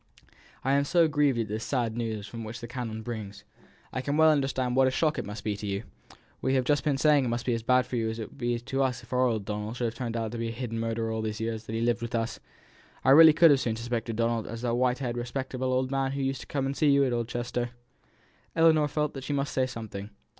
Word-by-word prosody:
"I 135 Hz, -, +1 dB
am 140 Hz, +1 st, +3 dB
so 165 Hz, +3 st, +4 dB
grieved 145 Hz, -4 st, +2 dB
at 115 Hz, -2 st, -1 dB
this 110 Hz, +2 st, -4 dB
sad 120 Hz, -5 st, -1 dB
news 110 Hz, -3 st, -4 dB
which 115 Hz, 0 st, -6 dB
the 120 Hz, -, -7 dB
canon 115 Hz, -3 st, -5 dB
brings. 105 Hz, -4 st, -6 dB, 0.5 s
I 130 Hz, -, -1 dB
can 145 Hz, +3 st, -1 dB
well 160 Hz, 0 st, +7 dB
understand 135 Hz, -4 st, 0 dB
what 130 Hz, 0 st, +5 dB
a -, -, +4 dB
shock 155 Hz, +3 st, +1 dB
it -, -, -4 dB
must 105 Hz, +2 st, -7 dB
be 105 Hz, -1 st, -1 dB
to 105 Hz, +1 st, -6 dB
you; 100 Hz, +2 st, -2 dB, 0.6 s
we 135 Hz, -, +1 dB
have 130 Hz, -, +3 dB
just 145 Hz, +2 st, +2 dB
been 145 Hz, -3 st, +1 dB
saying 145 Hz, 0 st, +4 dB
it -, -, -1 dB
must 120 Hz, +1 st, -2 dB
be 125 Hz, -, +1 dB
as 115 Hz, -, -1 dB
bad 125 Hz, +2 st, +3 dB
for 125 Hz, -1 st, -3 dB
you 115 Hz, -1 st, 0 dB
as 110 Hz, -, -4 dB
it 110 Hz, -, -5 dB
would -, -, -18 dB
be 120 Hz, -1 st, 0 dB
to 130 Hz, +3 st, -2 dB
us 125 Hz, -2 st, 0 dB
if 120 Hz, -, -10 dB
our 125 Hz, 0 st, +3 dB
old 110 Hz, -4 st, -1 dB
Donald 105 Hz, +3 st, -4 dB
should 120 Hz, -2 st, -1 dB
turn 115 Hz, -1 st, -4 dB
out 115 Hz, -2 st, -2 dB
to 120 Hz, -, -5 dB
have -, -, -6 dB
been 115 Hz, -, -1 dB
a -, -, -3 dB
hidden 115 Hz, -1 st, -4 dB
murderer 115 Hz, 0 st, -1 dB
all 110 Hz, 0 st, -2 dB
these 110 Hz, -1 st, -3 dB
years 110 Hz, 0 st, -3 dB
that 110 Hz, -, -6 dB
he 115 Hz, -, -1 dB
has -, -, +1 dB
lived 120 Hz, 0 st, +1 dB
with 120 Hz, +1 st, -3 dB
us; 115 Hz, 0 st, -2 dB, 0.7 s
I 130 Hz, -, +6 dB
really 160 Hz, +3 st, +10 dB
could 165 Hz, +1 st, +6 dB
have 140 Hz, -, +6 dB
as -, -, -4 dB
soon 115 Hz, -2 st, -1 dB
suspected 115 Hz, 0 st, -3 dB
Donald 115 Hz, -1 st, 0 dB
as 115 Hz, +1 st, -6 dB
that 120 Hz, -1 st, 0 dB
white 125 Hz, +1 st, +2 dB
haired 120 Hz, -3 st, -3 dB
respectable 130 Hz, +1 st, -3 dB
old 130 Hz, +1 st, 0 dB
man 135 Hz, -1 st, 0 dB
who 140 Hz, -, -2 dB
used 135 Hz, -1 st, -2 dB
to -, -, -11 dB
come 135 Hz, -2 st, -1 dB
and 135 Hz, +1 st, -2 dB
see 150 Hz, -, +3 dB
you 140 Hz, 0 st, +5 dB
at 125 Hz, -, 0 dB
East 120 Hz, -1 st, -2 dB
Chester." 120 Hz, 0 st, -2 dB, 0.9 s
Ellinor 160 Hz, -2 st, +5 dB
felt 150 Hz, 0 st, -1 dB
that 135 Hz, -, -7 dB
she 145 Hz, -, -3 dB
must 140 Hz, 0 st, -1 dB
say 130 Hz, -1 st, +1 dB
something. 110 Hz, -4 st, -7 dB
120 Hz, 280 wpm, -28 LUFS, 115-135 Hz, 0.9 s, really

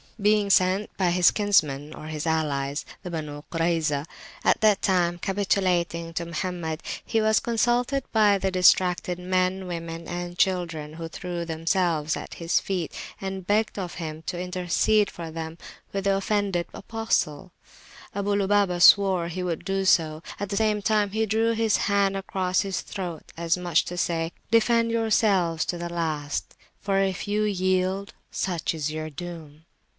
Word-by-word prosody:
Being 210 Hz, 0 st, +3 dB
sent 185 Hz, +2 st, +3 dB
for -, -, -38 dB
by 185 Hz, -3 st, +2 dB
his 180 Hz, 0 st, +5 dB
kinsmen 155 Hz, -8 st, +1 dB
or 155 Hz, -, -9 dB
his 155 Hz, 0 st, -4 dB
allies, 145 Hz, -3 st, -1 dB, 0.2 s
the 180 Hz, -, -6 dB
Benu 150 Hz, -3 st, -5 dB
Kurayzah, 165 Hz, -4 st, 0 dB, 0.4 s
at -, -, +3 dB
that 215 Hz, -2 st, +4 dB
time 175 Hz, -3 st, +2 dB
capitulating 180 Hz, -3 st, 0 dB
to 170 Hz, +1 st, -2 dB
Mohammed, 170 Hz, -1 st, -4 dB, 0.2 s
he 225 Hz, -2 st, 0 dB
was 220 Hz, 0 st, +4 dB
consulted 240 Hz, +3 st, +1 dB
by 210 Hz, -3 st, +4 dB
the 190 Hz, 0 st, -1 dB
distracted 180 Hz, -1 st, +3 dB
men, 185 Hz, +1 st, 0 dB
women, 165 Hz, -1 st, -6 dB
and 175 Hz, 0 st, -5 dB
children, 170 Hz, -6 st, 0 dB
who 165 Hz, +1 st, -6 dB
threw 175 Hz, 0 st, -5 dB
themselves 165 Hz, -1 st, 0 dB
at -, -, -7 dB
his 170 Hz, 0 st, +1 dB
feet, 180 Hz, -5 st, -3 dB, 0.3 s
and 190 Hz, -1 st, -5 dB
begged 210 Hz, 0 st, +1 dB
of 180 Hz, -3 st, -5 dB
him 155 Hz, -2 st, -5 dB
to 175 Hz, -, -3 dB
intercede 180 Hz, +3 st, +1 dB
for 165 Hz, -2 st, -7 dB
them 160 Hz, 0 st, -6 dB, 0.3 s
with 195 Hz, -1 st, -2 dB
the 195 Hz, 0 st, +2 dB
offended 195 Hz, -3 st, 0 dB
Apostle. 195 Hz, -7 st, -2 dB, 0.6 s
Abu 200 Hz, 0 st, 0 dB
Lubabah 200 Hz, -3 st, +2 dB
swore 190 Hz, -3 st, +6 dB
he 180 Hz, +2 st, -4 dB
would 170 Hz, -3 st, -3 dB
do 195 Hz, 0 st, -1 dB
so: 160 Hz, -4 st, +3 dB, 0.2 s
at 205 Hz, -, -3 dB
the 200 Hz, -, -2 dB
same 215 Hz, -2 st, +1 dB
time, 210 Hz, -2 st, +2 dB
he 220 Hz, +2 st, +1 dB
drew 225 Hz, +2 st, +2 dB
his 225 Hz, -1 st, +2 dB
hand 200 Hz, -1 st, +2 dB
across 190 Hz, -1 st, 0 dB
his 195 Hz, -2 st, -2 dB
throat, 175 Hz, -5 st, -6 dB
as 170 Hz, +1 st, +1 dB
much 175 Hz, -3 st, +2 dB
as -, -, -15 dB
to 180 Hz, -, -5 dB
say, 165 Hz, -1 st, -1 dB, 0.2 s
"Defend 230 Hz, 0 st, +3 dB
yourselves 205 Hz, -7 st, +2 dB
to 175 Hz, -, -2 dB
the 170 Hz, 0 st, -4 dB
last, 155 Hz, -3 st, -3 dB, 0.2 s
for 195 Hz, -1 st, 0 dB
if 195 Hz, 0 st, -1 dB
you 210 Hz, +1 st, +1 dB
yield, 185 Hz, 0 st, 0 dB, 0.2 s
such 170 Hz, -3 st, -2 dB
is 155 Hz, -1 st, -2 dB
your 155 Hz, 0 st, -4 dB
doom." 160 Hz, -1 st, -9 dB
180 Hz, 165 wpm, -25 LUFS, 165-200 Hz, 0.6 s, swore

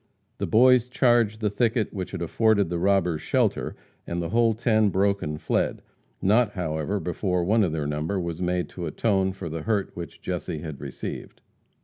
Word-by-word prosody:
The -, -, -1 dB
boys 125 Hz, +1 st, +5 dB
charged 120 Hz, -4 st, +2 dB
the 105 Hz, -2 st, +1 dB
thicket 115 Hz, 0 st, 0 dB
which 95 Hz, -2 st, -4 dB
had 95 Hz, -3 st, -4 dB
afforded 105 Hz, +1 st, +2 dB
the 85 Hz, -, -1 dB
robbers 90 Hz, -4 st, +2 dB
shelter, -, -, 0 dB, 0.3 s
and 85 Hz, -, -2 dB
the 85 Hz, -1 st, -3 dB
whole 115 Hz, 0 st, +3 dB
ten 110 Hz, -2 st, +2 dB
broke 100 Hz, +1 st, +1 dB
and 75 Hz, 0 st, -4 dB
fled, -, -, -1 dB, 0.4 s
not 105 Hz, +2 st, +3 dB
however, 85 Hz, +2 st, -2 dB
before 90 Hz, +1 st, -1 dB
one 110 Hz, +5 st, +3 dB
of 90 Hz, -, +1 dB
their 75 Hz, -2 st, -2 dB
number 75 Hz, +6 st, -2 dB
was 85 Hz, -1 st, -4 dB
made 90 Hz, 0 st, 0 dB
to 85 Hz, -2 st, -5 dB
atone 95 Hz, +3 st, +1 dB
for 95 Hz, -2 st, -7 dB
the 80 Hz, 0 st, -4 dB
hurt 105 Hz, -1 st, -1 dB
which 85 Hz, -3 st, -8 dB
Jesse -, -, -4 dB
had 75 Hz, -4 st, -7 dB
received. -, -, -7 dB
95 Hz, 185 wpm, -25 LUFS, 85-110 Hz, 0.4 s, boys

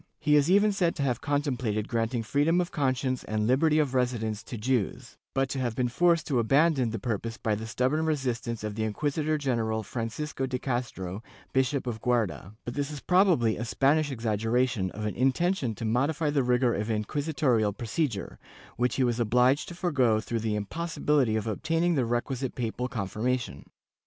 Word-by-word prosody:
He 150 Hz, -1 st, +3 dB
is 145 Hz, +2 st, +4 dB
even 205 Hz, +3 st, +5 dB
said 180 Hz, -4 st, +1 dB
to 140 Hz, -, -2 dB
have 125 Hz, -4 st, 0 dB
contemplated 130 Hz, -8 st, -1 dB
granting 115 Hz, 0 st, -1 dB
freedom 145 Hz, +9 st, +2 dB
of 180 Hz, -1 st, -1 dB
conscience 130 Hz, -3 st, 0 dB
and 105 Hz, 0 st, -1 dB
liberty 150 Hz, +6 st, +3 dB
of 145 Hz, -4 st, +1 dB
residence 115 Hz, -4 st, 0 dB
to 120 Hz, -, -6 dB
Jews, 120 Hz, -2 st, -1 dB, 0.2 s
but 135 Hz, 0 st, +2 dB
to 135 Hz, -, -3 dB
have 120 Hz, -3 st, -1 dB
been 125 Hz, 0 st, 0 dB
forced 170 Hz, +4 st, +3 dB
to 135 Hz, -5 st, +1 dB
abandon 135 Hz, +1 st, +3 dB
the 115 Hz, -, -3 dB
purpose 115 Hz, +1 st, -3 dB
by 110 Hz, -, -1 dB
the 110 Hz, +2 st, -4 dB
stubborn 130 Hz, +8 st, 0 dB
resistance 125 Hz, -6 st, -2 dB
of 105 Hz, -1 st, -3 dB
the 110 Hz, +1 st, -2 dB
inquisitor 150 Hz, +7 st, -1 dB
general 115 Hz, -6 st, -1 dB
Francisco 125 Hz, +6 st, -4 dB
de 130 Hz, 0 st, -2 dB
Castro, 120 Hz, -7 st, -3 dB, 0.3 s
Bishop 130 Hz, +1 st, +1 dB
of 115 Hz, -3 st, -4 dB
Guarda,^ 110 Hz, -5 st, -1 dB
but 120 Hz, -, -4 dB
this 145 Hz, +1 st, -2 dB
is 150 Hz, -2 st, -6 dB
probably 175 Hz, -, +3 dB
a 115 Hz, -, -3 dB
Spanish 145 Hz, +5 st, +2 dB
exaggeration 115 Hz, -2 st, 0 dB
of 105 Hz, +3 st, -6 dB
an 105 Hz, -, -1 dB
intention 135 Hz, -, +1 dB
to 115 Hz, -, -5 dB
modify 145 Hz, +7 st, +1 dB
the 145 Hz, -2 st, +2 dB
rigor 125 Hz, -1 st, +2 dB
of 105 Hz, +1 st, -2 dB
inqui 110 Hz, +6 st, -1 dB
sitorial 130 Hz, -8 st, +1 dB
procedure, 120 Hz, -, -2 dB, 0.4 s
which 125 Hz, +1 st, +1 dB
he 135 Hz, -, +2 dB
was 120 Hz, -1 st, +1 dB
obliged 125 Hz, +5 st, +3 dB
to 175 Hz, -, -8 dB
forego 135 Hz, -, +2 dB
through 115 Hz, +1 st, -3 dB
the 110 Hz, -1 st, -1 dB
impossibility 145 Hz, +1 st, 0 dB
of 110 Hz, -, -1 dB
obtaining 165 Hz, +10 st, 0 dB
the 135 Hz, -6 st, +1 dB
requisite 120 Hz, +2 st, -2 dB
papal 125 Hz, +1 st, -2 dB
confirmation. 115 Hz, -, -3 dB
125 Hz, 180 wpm, -28 LUFS, 110-145 Hz, 0.4 s, even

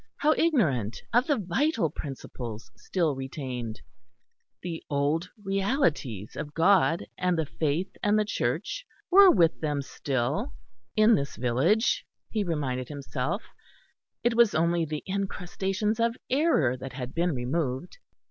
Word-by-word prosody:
how 305 Hz, +1 st, +4 dB
ignorant 150 Hz, -, +1 dB
of 245 Hz, +3 st, +4 dB
the 290 Hz, -3 st, +2 dB
vital 210 Hz, -, +1 dB
principles 125 Hz, -6 st, -7 dB
still 165 Hz, -6 st, -1 dB
retained! 130 Hz, -4 st, -5 dB, 0.8 s
The 170 Hz, -2 st, -5 dB
old 150 Hz, +5 st, 0 dB, 0.2 s
realities 195 Hz, -, 0 dB
of 145 Hz, 0 st, -6 dB
God 175 Hz, -1 st, +4 dB
and 180 Hz, -1 st, +1 dB
the 160 Hz, -, +1 dB
faith 155 Hz, +4 st, -2 dB
and 210 Hz, +1 st, +3 dB
the 215 Hz, -, +2 dB
Church -, -, -2 dB, 0.3 s
were 390 Hz, +1 st, +9 dB
with 170 Hz, -, +3 dB
them 145 Hz, -3 st, -1 dB
still, 140 Hz, -, -2 dB, 0.4 s
in 215 Hz, +2 st, +6 dB
this 140 Hz, -7 st, 0 dB
village, 135 Hz, -, +2 dB, 0.3 s
he 215 Hz, -2 st, 0 dB
reminded 140 Hz, -8 st, -2 dB
himself; 140 Hz, -, -3 dB, 0.8 s
it 240 Hz, -, +3 dB
was 230 Hz, -3 st, +4 dB
only 170 Hz, +1 st, +2 dB
the 155 Hz, -1 st, -4 dB
incrustations 195 Hz, +2 st, -2 dB
of 230 Hz, +1 st, +1 dB
error 260 Hz, -, +3 dB
that 130 Hz, +1 st, -8 dB
had 125 Hz, -1 st, -6 dB
been 170 Hz, -2 st, +1 dB
removed. 130 Hz, +3 st, -2 dB
165 Hz, 130 wpm, -28 LUFS, 135-210 Hz, 0.8 s, were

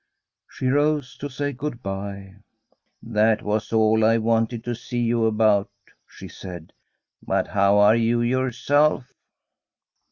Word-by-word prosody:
She -, -, -7 dB
rose 145 Hz, -1 st, 0 dB
to 145 Hz, -, -6 dB
say 145 Hz, +2 st, -3 dB
good 130 Hz, -1 st, -6 dB
bye. 100 Hz, 0 st, -6 dB, 0.3 s
* -, -, -40 dB, 0.2 s
That 110 Hz, 0 st, +3 dB
was 105 Hz, 0 st, -2 dB
all 110 Hz, 0 st, +3 dB
I 115 Hz, +1 st, +4 dB
wanted 115 Hz, +1 st, 0 dB
to 120 Hz, -, -3 dB
see 120 Hz, +1 st, -5 dB
you 115 Hz, -1 st, +1 dB
about,' 105 Hz, -2 st, +2 dB, 0.4 s
she -, -, -12 dB
said. 90 Hz, -4 st, -10 dB, 0.2 s
* -, -, -59 dB
But -, -, -1 dB
how 100 Hz, 0 st, +3 dB
are 105 Hz, +2 st, +5 dB
you 115 Hz, +1 st, +1 dB
yourself? 130 Hz, +3 st, +1 dB
115 Hz, 140 wpm, -23 LUFS, 105-125 Hz, 0.4 s, are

